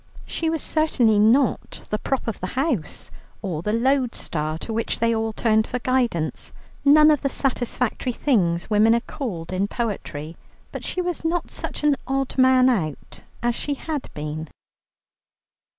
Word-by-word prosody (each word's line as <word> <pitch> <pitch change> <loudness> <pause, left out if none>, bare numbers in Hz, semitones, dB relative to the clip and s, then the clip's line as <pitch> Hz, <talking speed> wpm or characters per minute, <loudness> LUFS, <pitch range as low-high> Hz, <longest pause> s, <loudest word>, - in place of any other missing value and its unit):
She 325 - -2
was 320 -1 -1
certainly 250 -9 +3
not 235 +4 +2
the 210 - 0
prop 270 0 -2
of 225 - -3
the 185 - -3
house, 260 - -2 0.3
or 170 -6 -3
the 210 - -1
lodestar 230 - 0
to 225 - -6
which 225 +1 -1
they 230 0 +2
all 225 0 -1
turned 220 0 +2
for 250 - -2
guidance, 245 -10 -1 0.3
none 305 +2 +7
of 295 - +2
the 275 - 0
satisfactory 250 -2 -1
things 185 - +1
women 220 +2 +4
are - - +2
called 185 - -5
in 190 +2 0
poetry, 170 -9 -4 0.4
but - - -6
she 365 - -2
was 355 -2 -3
not 335 +1 -1
such - - -5
an 295 -2 +3
odd 270 0 -1
man 260 -1 +5
out 170 - -2 0.2
as 240 0 +2
she 285 +4 -3
had 300 0 -5
been. 150 +1 -5
235 Hz, 160 wpm, -23 LUFS, 200-270 Hz, 0.4 s, none